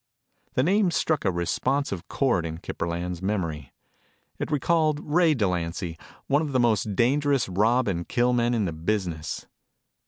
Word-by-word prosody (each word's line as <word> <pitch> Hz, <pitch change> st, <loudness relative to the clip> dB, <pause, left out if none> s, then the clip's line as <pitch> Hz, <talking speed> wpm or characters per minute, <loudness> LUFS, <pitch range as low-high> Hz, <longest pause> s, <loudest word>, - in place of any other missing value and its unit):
The 130 Hz, -, +3 dB
name 195 Hz, +4 st, +3 dB
struck 160 Hz, -4 st, 0 dB
a 95 Hz, -, +3 dB
responsive 100 Hz, +4 st, -1 dB
cord 125 Hz, -11 st, +1 dB
in 80 Hz, -1 st, -4 dB
Kip 85 Hz, -, -8 dB
Burland's 85 Hz, +1 st, -3 dB
memory. 85 Hz, -9 st, -2 dB, 0.7 s
It -, -, -3 dB
recalled 155 Hz, 0 st, +2 dB
Ray 160 Hz, +1 st, +3 dB
Delancy, 90 Hz, -5 st, -1 dB, 0.3 s
one 145 Hz, +2 st, +2 dB
of 150 Hz, -3 st, -3 dB
the 130 Hz, -, +3 dB
most 110 Hz, -4 st, +1 dB
dangerous 140 Hz, +3 st, +2 dB
rob 110 Hz, +7 st, +2 dB
and 85 Hz, -3 st, -2 dB
kill 125 Hz, +1 st, +2 dB
men 120 Hz, 0 st, +2 dB
in 110 Hz, -3 st, +1 dB
the 85 Hz, -, -2 dB
business. 80 Hz, -2 st, -3 dB
110 Hz, 155 wpm, -26 LUFS, 85-140 Hz, 0.7 s, The